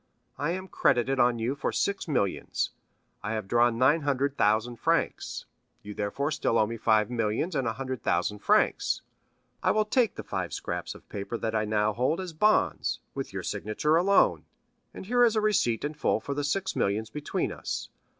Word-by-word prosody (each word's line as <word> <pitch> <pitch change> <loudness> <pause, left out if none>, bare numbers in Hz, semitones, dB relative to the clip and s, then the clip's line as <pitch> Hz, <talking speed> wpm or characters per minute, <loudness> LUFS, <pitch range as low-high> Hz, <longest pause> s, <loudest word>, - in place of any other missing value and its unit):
I 145 - 0
am 185 +2 -3
credited 135 -5 +2
on 120 -1 +4
you 115 +4 -1
for 145 - -2
six 200 -2 -1
millions. 110 - -1 0.5
I 105 - -3
have 110 -3 -3
drawn 120 +1 +3
nine 140 +6 +4
hundred 140 -1 0
thousand 110 +2 +1
francs, - - -1 0.4
you 105 +1 -7
therefore 105 +9 -2
still 145 -6 +1
owe 110 - +4
me 115 +2 -5
five 110 -1 +2
millions 115 - -1
and 135 -4 0
a 110 - 0
hundred 130 0 -5
thousand 95 +4 0
francs. - - +2 0.6
I - - +2
will 215 0 +3
take 230 +1 +2
the - - -6
five - - -4
scraps - - -4
of - - -15
paper 100 +3 -5
that 110 -1 -2
I 110 -1 +1
now 105 0 +1
hold 130 - 0
as 185 -3 -5
bonds, 210 +7 +2 0.2
with - - -5
your - - -5
signature 130 +9 0
alone, 195 +4 +3 0.5
and - - -9
here 245 +4 +3
is 230 -2 +4
a - - +3
receipt 185 - +1
in 150 - -3
full 150 - 0
for 140 - -4
the 145 +1 -2
six 190 +7 -1
millions 110 +3 0
between 150 +2 -2
us. - - -5
130 Hz, 190 wpm, -28 LUFS, 110-160 Hz, 0.6 s, on